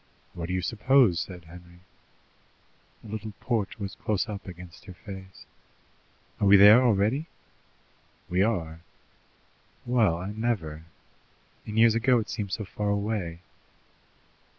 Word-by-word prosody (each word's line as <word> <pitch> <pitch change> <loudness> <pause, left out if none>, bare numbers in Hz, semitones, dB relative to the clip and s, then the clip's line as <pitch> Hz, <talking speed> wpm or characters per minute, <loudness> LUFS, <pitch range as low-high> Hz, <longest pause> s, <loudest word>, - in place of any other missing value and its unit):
"What 85 -1 -5
do 90 - -3
you 90 - -2
suppose?" 115 -3 +3
said 90 -2 -7
Henry. 85 +1 -15 1.2
A - - -12
little 110 0 -6
porch 115 -6 -2
was 100 -2 -5
close 105 -3 -2
up 100 -2 -7
against 90 -1 -11
her 90 - -11
face. 95 -1 -11 0.9
"Are 100 - +2
we 100 +1 +8
there 105 +5 +8
already?" 120 +6 +1 1.0
"We 90 +2 +1
are." 85 -7 -1 1.0
"Well, 115 -9 +2
I 95 +4 -5
never! 100 -9 -3 0.8
In 105 0 -5
years 115 0 +6
ago 125 +2 +3
it 110 - -3
seemed 105 -4 -4
so 105 +2 -3
far 105 +1 -3
away." 100 -5 -2
100 Hz, 130 wpm, -27 LUFS, 90-110 Hz, 1.2 s, we